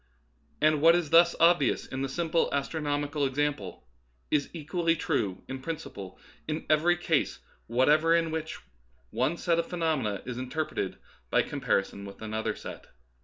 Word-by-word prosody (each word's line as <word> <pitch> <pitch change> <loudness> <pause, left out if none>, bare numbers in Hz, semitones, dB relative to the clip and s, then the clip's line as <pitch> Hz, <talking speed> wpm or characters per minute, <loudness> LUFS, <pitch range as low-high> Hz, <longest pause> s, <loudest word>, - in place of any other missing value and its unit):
And 155 -1 +3
what 165 +2 +7
is 175 -4 -1
thus 170 +1 +6
obvious 165 -5 +4
in 130 - -5
this 135 -1 -3
simple 170 -1 +1
astro 140 +3 -2
nomical 145 0 0
example 130 - -3 0.4
is 145 -2 +1
equally 165 +1 0
true 120 - -1
in 130 0 -6
principle 115 - -7 0.3
in 155 +1 -3
every 170 +3 +4
case 160 -3 0 0.3
whatever 150 +7 +4
in 165 -1 +1
which 160 0 -4 0.5
one 170 - 0
set 170 -1 +1
of 170 - -1
phenom 165 -4 0
ena 105 -5 -3
is 125 0 -5
interpreted 150 +5 -3 0.3
by - - +3
comparison 100 +1 -1
with 100 - -10
another 110 0 -3
set. - - -9
150 Hz, 155 wpm, -28 LUFS, 130-165 Hz, 0.5 s, what